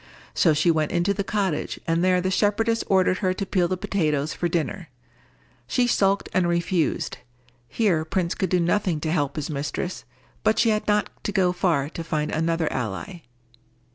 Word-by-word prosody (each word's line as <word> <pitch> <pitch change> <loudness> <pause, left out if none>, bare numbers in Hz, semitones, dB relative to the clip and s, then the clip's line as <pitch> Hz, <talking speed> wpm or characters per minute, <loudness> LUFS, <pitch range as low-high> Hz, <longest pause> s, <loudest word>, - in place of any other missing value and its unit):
So 160 -4 +3
she 155 +3 +3
went 155 -2 0
into 175 +3 +1
the 200 0 -2
cottage, 195 -6 -2
and 165 +1 +1
there 185 -1 +3
the 185 +1 -1
shepherdess 225 +4 +1
ordered 185 -1 +3
her 185 -2 0
to 195 - -3
peel 185 -2 +1
the 185 +1 -2
potatoes 155 -6 -1
for 175 - -2
dinner. 170 +1 -2 0.8
She 250 - +2
sulked 200 -4 +2
and 185 -1 +2
refused. 170 -1 0 0.5
Here 180 - +1
Prince 175 +1 -1
could 190 - -2
do 180 - +2
nothing 175 -1 +1
to 155 - -1
help 145 -4 0
his 150 0 -3
mistress, 145 +5 -4 0.4
but 220 0 +3
she 230 - +4
had 215 -1 0
not 210 0 +1
to - - -2
go 190 -3 +2
far 170 -6 +1
to 165 - -6
find 155 -2 -2
another 165 0 0
ally. 125 - -4
175 Hz, 180 wpm, -24 LUFS, 160-195 Hz, 0.8 s, she